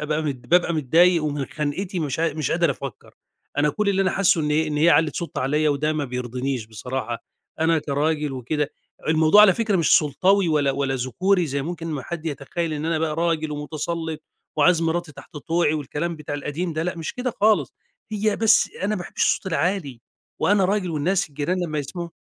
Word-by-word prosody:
أ - - -7
أبقى 150 +1 -1
ب 140 -5 -3
بابقى 175 -1 +3
متضايق 165 +3 +4
ومن 145 -2 -2
خنقتي 175 +5 -3
مش 150 0 -2
ع 165 -2 +1
مش 155 -2 -2
قادر 170 -3 +2
أفكر، 135 -3 -7 0.4
أنا 150 +1 +3
كل 210 +3 -1
اللي 195 -1 +2
أنا 185 - +1
حاسه 190 -3 +3
إني 150 +1 +1
ه - - -5
إن 150 - -2
هي 160 +3 +5
علّت 160 -3 +3
صوتها 170 - -4
عليّا 150 +3 +2
وده 150 +2 0
ما 155 -2 -1
بيرضنيش 125 -1 -3
بصراحة، 120 +2 -5 0.4
أنا 165 0 +3
كراجل 150 0 -1
وكده 145 +4 -2 0.4
الموضوع 160 +5 +6
على 205 -3 +7
فكرة 225 -4 +1
مش 165 -3 +5
سلطوي 185 +5 +2
ولا 150 -3 +2
ولا 135 0 -1
ذكوري 170 - +1
زي 140 -1 -2
ممكن 165 +2 -5
ما 150 -5 -3
حد 165 +2 -6
يتخيل 160 +3 -3
إن 150 0 -3
أنا 165 -1 0
بقى 155 -1 -1
راجل 165 -2 0
ومتسلط 155 +2 -4 0.3
وعايز 165 +2 +4
مراتي 165 -1 -1
تحت 155 +3 -13
طوعي 160 +1 +1
والكلام 155 +3 -3
بتاع 150 -1 -6
القديم 150 +4 -3
ده، 155 0 -2
لأ 180 +1 -3
مش 160 - -5
كده 250 0 -2
خالص، 215 +1 +3 0.4
هي 210 0 0
بس 225 0 +4
أنا - - +1
ما - - -3
باحبش 180 - -4
الصوت - - +1
العالي 165 -6 -1 0.4
وأنا 200 -1 +3
راجل 190 -1 0
والناس 170 +5 0
الجيران 150 +5 -2
لمّا 155 -3 -3
يسمعوا 170 +5 -5
155 Hz, 200 wpm, -23 LUFS, 145-175 Hz, 0.4 s, على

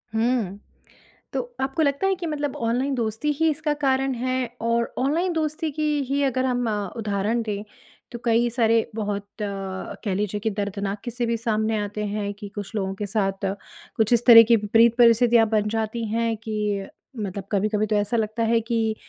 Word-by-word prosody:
हुँ। 220 -4 0 0.7
तो - - 0 0.2
आपको 270 +4 -1
लगता 280 +6 +1
है 385 - +2
कि 360 -1 -6
मतलब 290 -2 -2
ऑनलाइन 245 +4 0
दोस्ती 230 +5 -1
ही 325 0 +4
इसका 300 0 0
कारण 270 0 +2
है? 255 +1 -1 0.2
और 235 0 0
ऑनलाइन 325 +8 +1
दोस्ती 315 0 -1
की 310 +2 -3 0.3
ही 280 +1 +1
अगर 260 -1 +1
हम 245 -2 0 0.3
उदाहरण 215 +1 -1
दें, 205 -2 -3 0.5
तो 235 - -6
कई 235 +1 +3
सारे 230 -1 +2
बहुत 205 -2 -3
कह 195 0 -4
लीजिए 210 +1 -1
कि 220 +2 -1
दर्दनाक 200 0 -3
क़िस्से 240 0 -2
भी 230 0 0
सामने 220 -1 0
आते 210 0 -3
हैं 205 0 -3
कि 205 0 -9
कुछ 205 +2 -6
लोगों 195 -2 -1
के 205 +1 -4
साथ 195 -1 -1 0.5
कुछ 220 +1 +2
इस 235 0 +2
तरह 230 -2 +11
की 230 - +8
विपरीत 225 +2 +4
परिस्थितियाँ 235 -1 +5
बन 210 -1 +1
जाती 225 +1 -2
हैं 230 +1 0
कि 210 -2 -2 0.3
मतलब 200 -2 -4
कभी-कभी 210 +1 +1
तो 215 - 0
ऐसा 205 +3 +1
लगता 220 +1 -1
है 230 +1 +3
कि, 225 -1 0
225 Hz, 180 wpm, -24 LUFS, 210-245 Hz, 0.7 s, तरह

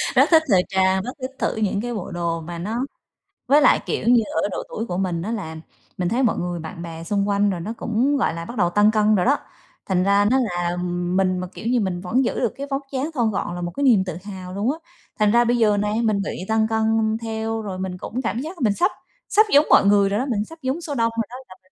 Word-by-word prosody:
rất - - +5
thích 320 -1 +6
thời 185 -3 +5
trang, 190 0 +2
rất 250 - -4
thích 255 +1 -4
thử - - 0
những 205 -2 0
cái 240 +1 -4
bộ 205 -6 -5
đồ 170 -1 -2
mà 170 +1 -7
nó 210 +7 -3 0.7
với 285 +4 +5
lại, 275 - +5
kiểu - - -2
như, 240 -1 +6 0.2
ở - - 0
độ - - -3
tuổi 225 - -4
của 180 -6 -4
mình 180 -3 -1
á 205 +6 -3
là 190 -8 -4 0.4
mình 180 -1 0
thấy 245 +4 +1
mọi 230 - +2
người 175 0 -3
bạn 165 +2 -8
bè 165 -1 -7
xung 200 +3 0
quanh 205 0 +2
rồi 185 -3 -2
nó 215 +7 -4
cũng, 250 +6 +1
gọi 215 - +1
là, 165 0 -6
bắt 235 - -8
đầu 175 -4 +3
tăng 205 +4 +4
cân 215 0 +3
rồi 180 - +1
đó, 280 +3 +4 0.5
thành 185 -2 +1
ra 200 +1 +3
nó 260 - +4
là 175 -7 -1 0.4
mình 185 -1 +2
mà, 180 - -4
kiểu - - -9
như, 245 +1 +2
mình 185 -4 -2
vẫn 225 +9 +1
giữ - - -1
được - - 0
cái 280 +1 -5
vóc 275 +1 0
dáng 275 +3 -2
thon 235 -6 +1
gọn 175 -3 -3
là 175 - -5
một 175 0 -3
cái 280 - -3
niềm 230 -8 +5
tự 180 -3 -5
hào 185 -3 -8
luôn 205 +6 0
á. 310 - -5 0.4
Thành 210 -1 +4
ra 235 +2 +5
bây 240 +1 +1
giờ 210 -3 +3
nè, 210 +1 0
mình 215 -3 +1
bị 200 - -3 0.2
tăng 220 0 +2
cân 220 0 +1
theo 225 0 -3
rồi 195 -3 -5
mình 185 -1 -4
cũng 230 +7 -4
cảm 230 -1 -2
giác 320 +4 -7
mình 215 -5 +3
sắp 360 - +2 0.4
sắp 430 +1 +5
giống 290 +2 +7
mọi - - +6
người 200 -1 +4
rồi 205 +2 0
đó, 255 - -1
mình 215 -6 -1
sắp 325 +5 -13
giống 265 +5 -2
số 310 -4 -5
đông 230 -2 +1
rồi 230 - +1
đó, 245 - -9
là 185 - -12
mình 185 - -32
210 Hz, 275 wpm, -22 LUFS, 185-240 Hz, 0.7 s, giống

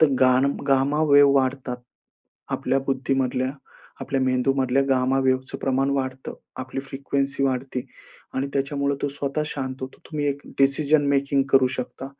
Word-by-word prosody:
तर 160 - +7
गान 130 +1 +5 0.2
gamma 140 +3 +2
wave 140 -1 +7
वाढतात. 130 -2 0 0.8
आपल्या 135 - 0
बुद्धीमधल्या, 130 -1 0 0.5
आपल्या 135 -1 -1
मेंदूमधल्या 130 +1 +2
गामा 130 0 +2
वेव्हजचं 130 0 0
प्रमाण 135 +1 0
वाढतं. 130 -1 -3 0.2
आपली 130 +1 -5
फ्रिकवेन्सी 140 +1 -2
वाढते 130 -1 -1 0.5
आणि 135 +1 -1
त्याच्यामुळे 140 0 0
तो 145 - +1
स्वतः 140 +2 -2
शांत 130 -3 -3
होतो. 130 - -7
तुम्ही 150 -2 -2
एक 140 0 -2 0.2
डिसिजन 140 +2 +3
मेकिंग 140 0 +2
करू 135 -1 +6
शकता. 125 +1 -5
135 Hz, 140 wpm, -24 LUFS, 130-140 Hz, 0.8 s, तर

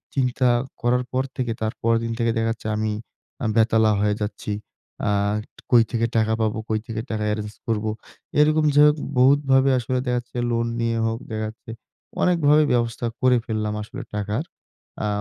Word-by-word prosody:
চিন্তা 125 -1 +2 0.3
করার 125 +1 +2
পর 130 +1 +1
থেকে 125 -2 -1
তার 110 0 -1
পরেরদিন 115 0 +1
থেকে 115 -1 +2
দেখা 115 0 +1
যাচ্ছে 110 -1 -6
আমি, 110 0 0 0.5
আমি 110 - 0
বেতালা 110 -1 +4
হয়ে 105 0 +2
যাচ্ছি। 105 0 -4 0.6
আ - - +3 0.6
কই 120 -2 +7
থেকে 115 -1 +1
টাকা 110 0 +2
পাবো, 110 0 0
কই 110 -1 +1
থেকে 110 -1 -3
টাকা 110 -1 -2
এরেঞ্জ 105 0 -5
করবো? 110 -1 0 0.5
এরকম 155 +1 +4
যাইহোক 150 +1 +6 0.2
বহুত 135 +3 +6
ভাবে 135 +1 +5
আসলে 125 +2 -2
দেখা 125 - +1
যাচ্ছে 120 0 -11
লোন 115 0 0
নিয়ে 115 0 0
হোক 115 0 -2
দেখা 110 0 -2
যাচ্ছে 115 +1 -11 0.5
অনেকভাবে 155 -4 +4
ব্যবস্থা 120 0 0 0.2
করে 125 -1 +5
ফেললাম 110 -1 -2
আসলে 130 +5 -8
টাকার। 105 +7 -2 0.6
আ - - 0
115 Hz, 170 wpm, -23 LUFS, 110-130 Hz, 0.6 s, কই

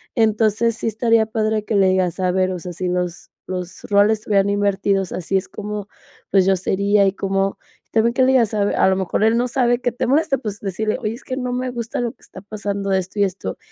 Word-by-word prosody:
Entonces, 220 0 +2
sí 230 - -3
estaría 225 0 +2
padre 215 -1 -1
que 215 - -1
le 195 -1 +4
digas: 185 -2 0
"A 185 -1 +1
ver, 185 0 +1
o 180 - -4
sea, 175 +1 -7
si 185 +2 -3
los 180 -1 -3 0.2
los 180 -1 -6
roles 205 +1 +3
estuvieran 200 -2 +1
invertidos, 200 -1 0
así 185 +2 -1
es 185 - -3
como, 210 -1 -6 0.4
pues 195 -2 +4
yo 195 - +4
sería 200 +2 +2
y 195 - +3
cómo", 195 0 -1 0.3
y - - -46
también 230 +1 +2
que 260 +1 +3
le 255 - +4
digas 235 -5 +3
a 205 -1 +2
ver, - - 0
a - - +4
lo 190 - +2
mejor, 190 +2 -1
él 225 +1 +4
no 245 +1 +1
sabe 245 -1 +1
que 245 - 0
te 240 - -2
molesta, 280 +1 +2
pues, 210 -5 -5
decirle: 215 +2 -2
"Oye, 220 -3 -2
es 235 - -11
que 260 - -5
no 250 -1 -2
me 255 +1 -2
gusta 235 -2 -4
lo 240 -1 -1
que - - -30
está - - -12
pasando, 200 -1 -4
esto 190 +1 -1
y - - +5
esto, 190 -1 -3
205 Hz, 245 wpm, -20 LUFS, 190-230 Hz, 0.4 s, y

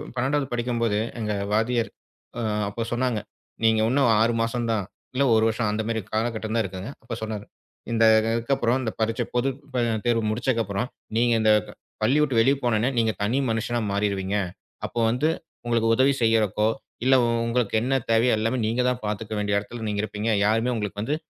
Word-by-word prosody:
12வது 135 +3 0
படிக்கும்போது 120 -3 0 0.2
எங்க 105 -2 -1 0.2
வாத்தியர். 115 +1 +1 0.5
அ - - -2 0.3
அப்போ 115 +3 -3
சொன்னாங்க. 125 -2 0 0.5
நீங்க 110 -1 +4
உன்னும் 135 -2 +3
6 115 +1 +3
மாசம் 115 0 -1
தான், 110 -3 0 0.3
இல்ல 140 - +3
1 110 - +4
வருஷம். 110 -1 -1
அந்த 110 +1 -1
மாரி 110 -1 -1
கால 110 +1 +1
கட்டம் 110 +1 -3
தான் 115 - +2
இருக்குதுங்க. 95 +6 -6
அப்ப 115 - -5
சொன்னாரு. 110 -2 -4 0.5
இந்த 115 -1 +3 0.3
இதுக்கு 115 +4 0
அப்புறம் 120 0 +1
அந்த 110 -3 -2
பரிட்சை 115 +2 0
பொது 125 +3 +2 0.6
தேர்வு 115 -2 +2
முடிச்ச 125 +4 -2 0.2
அப்புறம் 100 +5 -2 0.3
நீங்க 120 0 +3
அந்த 110 0 +4 0.5
பள்ளி 130 +7 +3
விட்டு 135 -6 +2
வெளிய 135 +4 +4
போனோனே 120 0 +2
நீங்க 115 -1 +3
தனி 115 +6 +1
மனுஷனா 120 +2 -1
மாறிடுவீங்க. 100 -1 -1 0.5
அப்போ 120 - -4
வந்து 135 +7 +1 0.4
உங்களுக்கு 115 -1 +1
உதவி 135 +2 +4
செய்யறக்கோ. 110 -2 +2 0.4
இல்ல 130 0 +6 0.3
உங்களுக்கு 115 -2 0
என்ன 130 +3 0 0.2
தேவை 115 +2 +4
எல்லாமே 115 +4 0
நீங்க 115 +3 +1
தான் 125 0 -2
பாத்துக்க 105 +1 -3
வேண்டிய 100 0 +1
இடத்துல 110 +2 -7
நீங்க 105 0 -1
இருப்பீங்க. 110 +1 -3 0.2
யாருமே 115 +3 +2
உங்களுக்கு 105 -2 -3
வந்து 145 +7 -1
115 Hz, 175 wpm, -25 LUFS, 110-120 Hz, 0.6 s, இல்ல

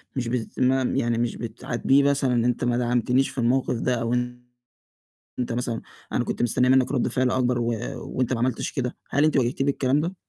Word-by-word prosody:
مش 125 -3 -2
بس 115 -1 -3
ما 130 +1 +3
يعني 120 -2 0
مش 120 -1 -1
بتعاتبيه 120 +4 0
مثلًا 140 -2 +2
أنت 125 +1 0
ما 120 -1 +1
دعمتنيش 125 +2 +1
في - - -13
الموقِف 125 +1 +1
ده 125 - +1
أو 115 +1 -1 1.3
أنت 125 -1 -2
مثلًا 120 -1 -2 0.3
أنا - - +1
كنت - - -3
مستنية 125 +2 +2
مِنّك 130 +1 +4
رَد 125 - +1
فعل 130 -1 +1
أكبر 125 -1 +1
و 120 0 0 0.2
وأنت 130 -1 -2
ما 120 - 0
عملتش 125 +2 -1
كده، 125 -2 -3
هل 145 +2 +2
أنتِ 155 - +3
واجهتيه 130 +1 +1
بالكلام 140 0 +1
ده؟ 175 +5 -2
125 Hz, 190 wpm, -24 LUFS, 120-130 Hz, 1.3 s, مِنّك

